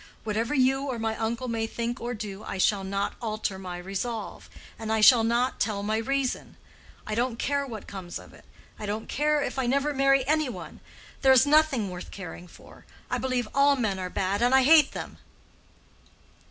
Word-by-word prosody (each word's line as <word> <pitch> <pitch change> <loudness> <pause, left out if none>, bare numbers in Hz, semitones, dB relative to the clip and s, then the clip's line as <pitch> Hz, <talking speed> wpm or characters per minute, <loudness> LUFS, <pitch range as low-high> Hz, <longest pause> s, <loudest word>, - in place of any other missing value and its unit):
"Whatever 225 +5 -1
you 270 +1 +2
or 255 -3 -3
my 225 -1 -2
uncle 230 +3 -2
may 225 -1 -1
think 235 +1 -4
or 240 +1 -3
do, 210 -1 -7
I - - -5
shall 195 +1 +2
not 195 +1 -2
alter 215 -4 -3
my 180 -2 -6
resolve, 195 +5 -5 0.3
and 220 -1 -4
I 220 - +2
shall 225 +2 +7
not 235 +3 +1
tell 205 -2 -1
my 215 +1 0
reason. 270 +3 -2 0.5
I 215 - -4
don't 235 +1 0
care 280 +2 -1
what 220 -5 -7
comes 185 -3 -7
of - - -14
it. - - -16 0.4
I 210 - -5
don't 215 +2 -3
care 300 0 +1
if - - -3
I 255 - 0
never 280 +3 +1
marry 275 -1 +3
any 305 0 +1
one. - - -8 0.4
There 265 - +6
is 260 0 +6
nothing 285 -9 +3
worth 180 0 -8
caring 180 -2 -9
for. - - -16 0.3
I - - 0
believe 255 -3 -1
all 280 +1 +5
men 215 -7 -1
are 185 -1 -3
bad, 195 +3 -1
and 245 +2 +4
I 265 - +6
hate 300 +1 +6
them." - - -7
230 Hz, 195 wpm, -27 LUFS, 210-265 Hz, 0.5 s, shall